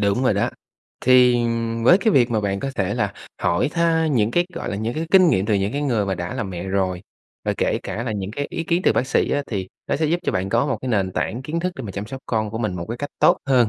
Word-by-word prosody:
Đúng 100 Hz, +5 st, +1 dB
rồi 105 Hz, -, +3 dB
đó. 100 Hz, -, +1 dB, 0.5 s
Thì, 125 Hz, -1 st, +6 dB
ừm, 115 Hz, -1 st, -1 dB
với 180 Hz, +9 st, +7 dB
cái 220 Hz, -2 st, +2 dB
việc 125 Hz, -2 st, +4 dB
mà 110 Hz, -2 st, +1 dB
bạn 100 Hz, -1 st, -1 dB
có 135 Hz, -, -2 dB
thể 95 Hz, -2 st, -1 dB
là -, -, -1 dB, 0.3 s
hỏi 105 Hz, +11 st, +2 dB
tha 165 Hz, -1 st, +2 dB
những 115 Hz, -7 st, +2 dB
cái, 175 Hz, +4 st, +2 dB
gọi -, -, -4 dB
là, -, -, -3 dB
những 110 Hz, +3 st, -2 dB
cái 160 Hz, +1 st, -2 dB
kinh 185 Hz, -3 st, +7 dB
nghiệm 95 Hz, -7 st, +2 dB
từ 105 Hz, -, +2 dB
những 100 Hz, +2 st, 0 dB
cái 145 Hz, +1 st, -2 dB
người 115 Hz, -8 st, +1 dB
mà 95 Hz, -, 0 dB
đã 85 Hz, 0 st, -5 dB
làm 100 Hz, -, -3 dB
mẹ 90 Hz, -1 st, -5 dB
rồi, 95 Hz, -2 st, -1 dB, 0.4 s
và -, -, +1 dB
kể -, -, +1 dB
cả 100 Hz, +5 st, -4 dB
là 115 Hz, -3 st, -2 dB
những 100 Hz, -1 st, -4 dB
cái 145 Hz, +6 st, -3 dB
ý 165 Hz, -, -3 dB
kiến 170 Hz, +3 st, +1 dB
từ -, -, +5 dB
bác 130 Hz, -, 0 dB
sĩ -, -, +1 dB
á, 145 Hz, -, +1 dB
thì 95 Hz, -4 st, -4 dB, 0.2 s
nó -, -, +1 dB
sẽ 155 Hz, +1 st, +1 dB
giúp 170 Hz, +3 st, 0 dB
cho -, -, -1 dB
bạn 95 Hz, +1 st, -1 dB
có 115 Hz, +6 st, +2 dB
một 130 Hz, -, 0 dB
cái 130 Hz, -, -4 dB
nền 95 Hz, -5 st, 0 dB
tảng 120 Hz, +6 st, -2 dB
kiến 160 Hz, +5 st, -3 dB
thức 180 Hz, +1 st, -1 dB
để 135 Hz, -, -5 dB
mà 100 Hz, -, -5 dB
chăm 100 Hz, +2 st, -5 dB
sóc 135 Hz, +2 st, -7 dB
con 110 Hz, -2 st, -1 dB
của 115 Hz, -, -4 dB
mình 105 Hz, -6 st, -1 dB
một 85 Hz, -, -5 dB
cái 115 Hz, -, -3 dB
cách 145 Hz, -, -4 dB
tốt -, -, +5 dB
hơn. 125 Hz, -4 st, +4 dB
115 Hz, 305 wpm, -22 LUFS, 100-140 Hz, 0.5 s, với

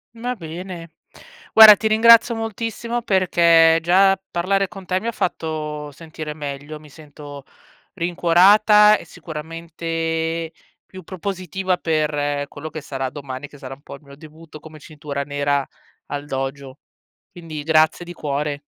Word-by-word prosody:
Va 245 Hz, +2 st, -4 dB
bene. 170 Hz, -2 st, -9 dB, 0.6 s
Guarda 220 Hz, -1 st, +10 dB
ti 220 Hz, -, -4 dB
ringrazio 230 Hz, +2 st, +6 dB
moltissimo, 225 Hz, +2 st, -4 dB
perché 170 Hz, -5 st, +4 dB
già 195 Hz, +3 st, +4 dB
parlare 195 Hz, +3 st, 0 dB
con 190 Hz, -1 st, -12 dB
te 185 Hz, +1 st, -1 dB
mi 220 Hz, -, -8 dB
ha 235 Hz, -, -1 dB
fatto 155 Hz, -5 st, -4 dB
sentire 155 Hz, 0 st, -8 dB
meglio. 145 Hz, 0 st, -7 dB
Mi 150 Hz, -, -16 dB
sento 145 Hz, -1 st, -12 dB, 0.5 s
rincuorata 195 Hz, +5 st, +4 dB
e -, -, -10 dB
sicuramente 165 Hz, 0 st, -5 dB, 0.3 s
più 185 Hz, 0 st, -12 dB
propositiva 185 Hz, 0 st, -4 dB
per 150 Hz, -3 st, -1 dB
quello 155 Hz, +2 st, -9 dB
che 155 Hz, -, -7 dB
sarà 135 Hz, -2 st, -5 dB
domani, 140 Hz, 0 st, -8 dB
che 145 Hz, -, -16 dB
sarà 135 Hz, 0 st, -8 dB
un 140 Hz, -, -23 dB
po' 140 Hz, -, -10 dB
il 140 Hz, -, -21 dB
mio 140 Hz, -1 st, -15 dB
debutto, 155 Hz, +1 st, -14 dB
come 155 Hz, 0 st, -13 dB
cintura 145 Hz, -2 st, -6 dB
nera, 145 Hz, -1 st, -1 dB, 0.4 s
al 145 Hz, 0 st, -6 dB
dojo, 135 Hz, 0 st, -6 dB, 0.5 s
quindi 160 Hz, -4 st, -8 dB
grazie 155 Hz, +2 st, +2 dB
di 175 Hz, -, -10 dB
cuore. 145 Hz, -2 st, -3 dB
160 Hz, 140 wpm, -20 LUFS, 145-185 Hz, 0.6 s, Guarda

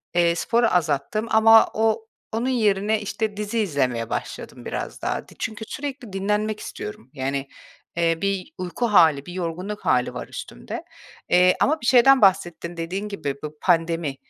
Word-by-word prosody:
eee, 170 Hz, -1 st, +3 dB
sporu 235 Hz, +6 st, +2 dB
azalttım. 170 Hz, +7 st, 0 dB
Ama 225 Hz, 0 st, +7 dB
o 220 Hz, 0 st, 0 dB, 0.2 s
onun 235 Hz, +4 st, -1 dB
yerine, 210 Hz, -3 st, +1 dB
işte, 210 Hz, 0 st, -3 dB
dizi 210 Hz, +2 st, -2 dB
izlemeye 130 Hz, -, 0 dB
başladım -, -, -6 dB
biraz -, -, -5 dB
daha. -, -, -2 dB
Ti -, -, -17 dB
çünkü 220 Hz, 0 st, -4 dB
sürekli 265 Hz, -6 st, -6 dB
dinlenmek 210 Hz, +2 st, -1 dB
istiyorum. 110 Hz, +4 st, -8 dB
Yani, 135 Hz, 0 st, -3 dB, 0.5 s
eee, 165 Hz, -1 st, +2 dB
bir 195 Hz, +9 st, -2 dB
uyku 185 Hz, +6 st, -2 dB
hâli, 160 Hz, -8 st, +5 dB
bir 175 Hz, -, -8 dB
yorgunluk 185 Hz, +4 st, -4 dB
hâli 125 Hz, 0 st, +2 dB
var -, -, -6 dB
üstümde. -, -, -7 dB, 0.5 s
Eee, 180 Hz, +1 st, +5 dB
ama 310 Hz, -1 st, +2 dB
bir -, -, -6 dB
şeyden 260 Hz, +1 st, +6 dB
bahsettin: 175 Hz, -3 st, +2 dB
Dediğin 185 Hz, +5 st, -3 dB
gibi, 145 Hz, -8 st, -3 dB
bu 150 Hz, 0 st, -6 dB
pandemi. 165 Hz, -4 st, +1 dB
195 Hz, 155 wpm, -23 LUFS, 165-220 Hz, 0.5 s, Ama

